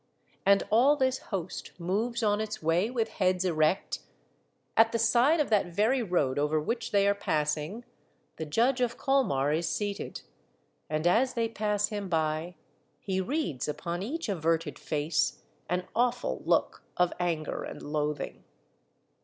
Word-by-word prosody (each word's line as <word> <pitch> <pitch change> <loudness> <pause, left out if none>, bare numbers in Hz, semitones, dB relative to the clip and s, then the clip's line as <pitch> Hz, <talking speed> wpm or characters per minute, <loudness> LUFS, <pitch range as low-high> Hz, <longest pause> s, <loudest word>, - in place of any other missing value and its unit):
And 200 0 +6
all 255 +7 +5
this 260 -2 +1
host 185 -4 -5
moves 220 +7 -1
on 210 0 +2
its 215 -1 -4
way 170 +7 +2
with 235 -3 0
heads 185 -3 +1
erect; 155 +1 +1 0.8
at 225 0 +5
the - - +2
side 240 +8 +4
of 295 - 0
that 205 -4 +3
very 215 +9 +2
road 160 - +1
over 150 +2 +2
which 230 +9 -2
they 200 -1 +3
are 200 - +4
passing, 155 +3 -2 0.5
the 160 - -4
Judge 245 - +2
of 240 -1 0
Colmar 200 - +2
is 165 +2 0
seated, 205 -1 -3 0.7
and 155 +1 -1
as 235 +9 +3
they 230 -1 +1
pass 210 -2 0
him 205 -3 -4
by 160 +1 -1 0.4
he 190 -1 -1
reads 190 - -2
upon 170 +4 -3
each 295 +10 -3
averted 165 -5 -1
face 150 -1 -1 0.3
an 180 +1 -1
awful 245 0 0
look - - +1
of 180 -1 +3
anger 165 -4 -1
and - - -8
loathing. 150 -1 -3
195 Hz, 150 wpm, -29 LUFS, 160-230 Hz, 0.8 s, And